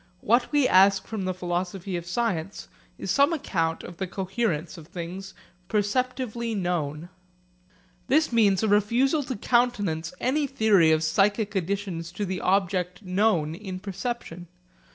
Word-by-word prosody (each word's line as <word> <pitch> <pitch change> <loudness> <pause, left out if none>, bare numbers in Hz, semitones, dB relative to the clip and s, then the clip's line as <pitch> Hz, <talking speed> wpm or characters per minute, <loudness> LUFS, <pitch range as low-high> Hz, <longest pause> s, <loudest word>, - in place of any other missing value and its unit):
What 240 +3 +2
we 290 -3 +4
ask 195 +1 +5
from 215 -4 -4
the 185 - -1
philosophy 180 +1 -3
of 170 0 -5
science 195 -3 -2 0.3
is - - -3
some 280 +4 +4
account 165 - -1
of 175 - -9
the 190 - -3
coherence 190 -3 -2
of 160 -3 -12
things 185 +3 -7 0.3
perceptively 235 +1 -1
known. 170 -3 -2 1.0
This 305 -1 +2
means 205 -4 +3
a - - +2
refusal 235 +9 +3
to 260 -2 -4
countenance 205 -8 +1
any 285 +4 +1
theory 210 -10 +4
of 155 0 +2
psychic 205 +5 +1
additions 190 -3 -3
to 205 - -3
the 185 -1 -3
object 185 0 0
known 185 -5 +1
in 185 0 -7
perception. 195 -3 -5
195 Hz, 140 wpm, -26 LUFS, 175-230 Hz, 1.0 s, ask